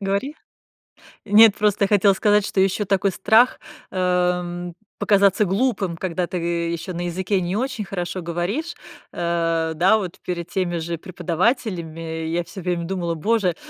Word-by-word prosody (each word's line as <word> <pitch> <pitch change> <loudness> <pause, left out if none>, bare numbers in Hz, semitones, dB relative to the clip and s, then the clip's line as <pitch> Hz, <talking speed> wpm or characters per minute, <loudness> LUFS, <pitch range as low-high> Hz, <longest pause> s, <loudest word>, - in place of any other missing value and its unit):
говори. 200 +10 -2 0.9
Нет, 215 0 +7
просто 210 0 +2
я - - +3
хотела 200 -1 +4
сказать, 210 +1 +2
что 190 - +1
еще 195 +2 +1
такой 195 0 +1
страх, 225 +7 +3 0.3
эм, 180 -1 -1 0.3
показаться 200 0 +3
глупым, 195 -4 0
когда 180 -1 -2
ты 180 - -4
еще 170 +1 -2
на 175 +1 -3
языке 185 +2 -1
не 175 +2 -2
очень 255 -3 -2
хорошо 180 -1 -4
говоришь, 180 - -3 0.4
э, 165 -1 -1
да, 185 +7 +4
вот 190 -2 -5
перед 170 -2 -4
теми 180 -2 -1
же 170 +1 -3
преподавателями. 170 - -2
Я 170 +2 -1
всё 190 +2 -10
время 175 -1 -2
думала: 175 -2 -2
"Боже, 195 0 +1
185 Hz, 150 wpm, -22 LUFS, 170-200 Hz, 0.9 s, Нет